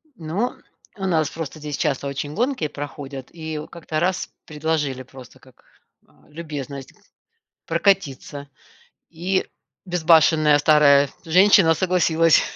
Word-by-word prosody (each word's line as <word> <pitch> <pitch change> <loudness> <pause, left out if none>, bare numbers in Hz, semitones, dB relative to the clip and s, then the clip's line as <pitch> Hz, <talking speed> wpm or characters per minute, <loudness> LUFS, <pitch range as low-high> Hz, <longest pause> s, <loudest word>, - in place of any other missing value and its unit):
Ну, 190 +7 -3 0.4
у 190 - -4
нас 160 -5 +1
просто 160 -1 -7
здесь 150 -1 -5
часто 140 -2 -1
очень 140 +2 -4
гонки 245 - 0
проходят. 140 -2 -8
И 160 -2 -6
как-то 160 -2 -4
раз 185 +2 -1 0.2
предложили 150 -4 -2
просто 130 0 -15
как, 130 -1 -22 0.4
а, - - -27
любезность 145 -4 -7 0.7
прокатиться, 165 -5 0 0.6
и 180 +3 -2 0.4
безбашенная 160 -3 +4
старая 145 -2 +5 0.2
женщина 180 0 +5
согласилась. 165 -2 +3
155 Hz, 110 wpm, -22 LUFS, 145-170 Hz, 0.7 s, старая